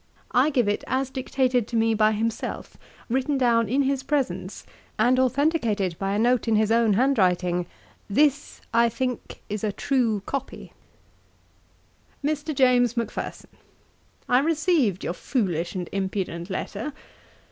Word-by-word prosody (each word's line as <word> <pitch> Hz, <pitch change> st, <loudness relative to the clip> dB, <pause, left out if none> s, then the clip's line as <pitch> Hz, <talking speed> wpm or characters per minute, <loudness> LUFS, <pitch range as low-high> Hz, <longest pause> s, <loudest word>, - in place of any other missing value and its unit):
I 260 Hz, +5 st, +4 dB
give 250 Hz, -7 st, +1 dB
it 205 Hz, -, 0 dB
as 265 Hz, 0 st, -1 dB
dictated 255 Hz, -3 st, 0 dB
to 240 Hz, -, -5 dB
me 225 Hz, 0 st, +3 dB
by 215 Hz, 0 st, +3 dB
himself, 225 Hz, +1 st, -3 dB, 0.3 s
written 265 Hz, +4 st, 0 dB
down 230 Hz, -4 st, +2 dB
in 275 Hz, +4 st, +2 dB
his 270 Hz, 0 st, 0 dB
presence, 255 Hz, -10 st, -2 dB, 0.3 s
and 245 Hz, +4 st, +3 dB
authenticated 255 Hz, -, +1 dB
by 195 Hz, 0 st, -1 dB
a -, -, +1 dB
note 240 Hz, +2 st, +2 dB
in 225 Hz, -, +3 dB
his 215 Hz, 0 st, +2 dB
own 230 Hz, -2 st, +4 dB
hand 260 Hz, +4 st, +2 dB
writing, 180 Hz, -1 st, +1 dB, 0.4 s
'This, 290 Hz, +6 st, +1 dB
I 235 Hz, 0 st, +4 dB
think, 250 Hz, +1 st, -4 dB
is 210 Hz, 0 st, -4 dB
a 215 Hz, -, 0 dB
true 225 Hz, -3 st, 0 dB
copy.' 275 Hz, -1 st, -5 dB, 1.5 s
'MR. 305 Hz, 0 st, -2 dB
JAMES 245 Hz, -2 st, +3 dB
MACPHERSON, 230 Hz, -, -4 dB, 0.8 s
'I 250 Hz, -, +4 dB
received 305 Hz, -, +1 dB
your -, -, -2 dB
foolish 180 Hz, -, -2 dB
and 180 Hz, -2 st, -3 dB
impudent 190 Hz, -3 st, -3 dB
letter. 210 Hz, +7 st, -4 dB
235 Hz, 140 wpm, -25 LUFS, 205-265 Hz, 1.5 s, I